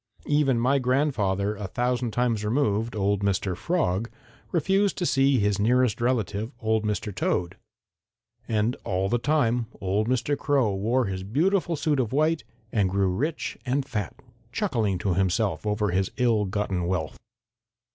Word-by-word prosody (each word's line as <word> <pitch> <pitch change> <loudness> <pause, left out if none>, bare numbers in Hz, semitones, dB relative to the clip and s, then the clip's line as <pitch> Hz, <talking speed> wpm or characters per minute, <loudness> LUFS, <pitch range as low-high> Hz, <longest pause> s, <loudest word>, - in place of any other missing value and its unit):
Even 145 -4 +2
my 130 +4 +3
grandfather 120 -7 +1
a 105 -1 -5
thousand 125 +2 -1
times 115 -1 0
removed, 110 -1 0
old 100 -1 +1
Mr. 95 -2 0
Frog, 115 - 0 0.4
refused 195 +4 +1
to 175 - -1
see 135 -3 +3
his 105 -2 +1
nearest 120 +1 +2
relative, 115 -2 0
old 110 -1 +1
Mr. 105 0 -2
Toad. 90 0 -1 0.9
And 110 +2 +1
all 95 +1 -1
the 120 - +1
time 120 -4 +1
old 100 +3 0
Mr. 130 +3 +1
Crow 135 -7 +1
wore 115 +6 +1
his 95 -2 -3
beautiful 170 - +1
suit 150 -1 0
of 120 -4 0
white 155 +2 +2 0.3
and 100 -4 +2
grew 95 0 +1
rich 145 - -2
and 135 +1 0
fat, 105 -7 -4 0.4
chuckling 115 - 0
to 90 +1 0
himself 95 +4 0
over 105 -1 0
his 95 +1 +1
ill 115 -4 +2
gotten 95 -3 -2
wealth. 85 -4 -2
110 Hz, 150 wpm, -26 LUFS, 100-135 Hz, 0.9 s, my